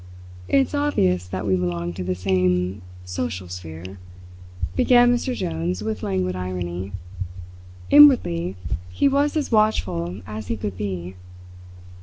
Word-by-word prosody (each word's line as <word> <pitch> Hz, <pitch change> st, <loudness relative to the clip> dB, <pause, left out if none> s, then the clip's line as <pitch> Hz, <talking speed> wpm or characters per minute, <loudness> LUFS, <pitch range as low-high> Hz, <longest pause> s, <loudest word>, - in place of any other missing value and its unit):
"It's 270 Hz, +1 st, +2 dB
obvious 95 Hz, -, +1 dB
that 95 Hz, +2 st, -4 dB
we 95 Hz, -2 st, +2 dB
belong 85 Hz, -1 st, -2 dB
to 90 Hz, +1 st, -5 dB
the 90 Hz, 0 st, -1 dB
same 90 Hz, 0 st, +1 dB, 0.2 s
social 90 Hz, 0 st, -4 dB
sphere," 90 Hz, +1 st, -8 dB, 0.8 s
began 245 Hz, -1 st, +5 dB
Mr. 245 Hz, +1 st, -1 dB
Jones 85 Hz, -, -2 dB
with 110 Hz, 0 st, -3 dB
languid 90 Hz, -2 st, -1 dB
irony. 90 Hz, 0 st, -4 dB, 1.0 s
Inwardly 95 Hz, -, +6 dB, 0.3 s
he 90 Hz, -, +2 dB
was 285 Hz, +3 st, +2 dB
as 295 Hz, -, -2 dB
watchful 100 Hz, -, +1 dB
as 105 Hz, +1 st, -7 dB
he 115 Hz, -, -2 dB
could 100 Hz, -1 st, -4 dB
be. 95 Hz, -3 st, -4 dB
95 Hz, 125 wpm, -23 LUFS, 90-115 Hz, 1.0 s, Inwardly